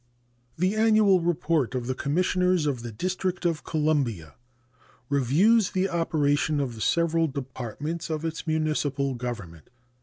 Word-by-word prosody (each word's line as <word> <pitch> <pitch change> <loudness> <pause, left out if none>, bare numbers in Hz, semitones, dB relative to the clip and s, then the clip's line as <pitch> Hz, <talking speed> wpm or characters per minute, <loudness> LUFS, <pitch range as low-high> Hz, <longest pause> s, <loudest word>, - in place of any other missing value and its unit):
The 185 +4 +1
annual 215 -4 +4
report 165 -6 0
of 125 -2 -2
the 130 - -1
Commissioners 180 +4 +1
of 135 -5 -1
the 120 -1 -6
District 185 - -3
of 165 -3 0
Columbia 135 - -1 0.8
reviews 170 - +3
the 190 +1 0
operations 155 -3 +1
of 125 -3 -4
the 110 - -9
several 165 +2 +2
departments 140 +4 -5
of 160 0 -3
its 165 +1 -4
municipal 150 -3 0
government. 115 -10 -7
155 Hz, 130 wpm, -26 LUFS, 130-175 Hz, 0.8 s, annual